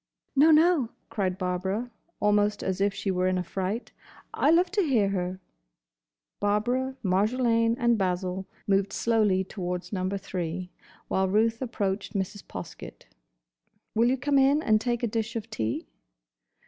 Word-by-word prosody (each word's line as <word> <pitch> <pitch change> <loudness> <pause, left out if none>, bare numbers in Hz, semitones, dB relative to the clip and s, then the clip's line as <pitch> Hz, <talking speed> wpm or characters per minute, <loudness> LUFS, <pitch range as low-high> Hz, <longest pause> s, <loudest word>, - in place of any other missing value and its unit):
"No, 290 +4 +6
no," 315 -5 +5 0.2
cried 190 -4 -1
Barbara, 190 +6 -2 0.3
almost 205 0 +2
as 190 0 -2
if 200 0 +3
she 195 0 -2
were 185 0 +1
in 185 0 +1
a 180 - -1
fright, 190 +6 -3 0.4
"I - - +2
love 350 +2 +4
to 415 0 +2
hear 240 - +2
her." 185 -1 -2 1.0
Barbara, 245 +6 0
Marjolaine, 230 +4 +2
and 235 -2 +2
Basil 185 0 -1 0.2
moved 195 0 +1
slowly 210 -5 +2
towards 180 -1 -5
Number 190 +1 -1
Three, 180 -2 -4 0.4
while 190 0 +1
Ruth 225 +4 +2
approached 205 -6 -2
Mrs. 195 0 -3
Poskett. 90 -8 -9 0.8
"Will 230 +2 +3
you 260 - +1
come 280 +1 +2
in 280 +3 +4
and 215 -1 +3
take 240 0 -1
a - - +3
dish 225 +1 -3
of 225 0 -5
tea?" 110 - -2
205 Hz, 145 wpm, -27 LUFS, 185-235 Hz, 1.0 s, No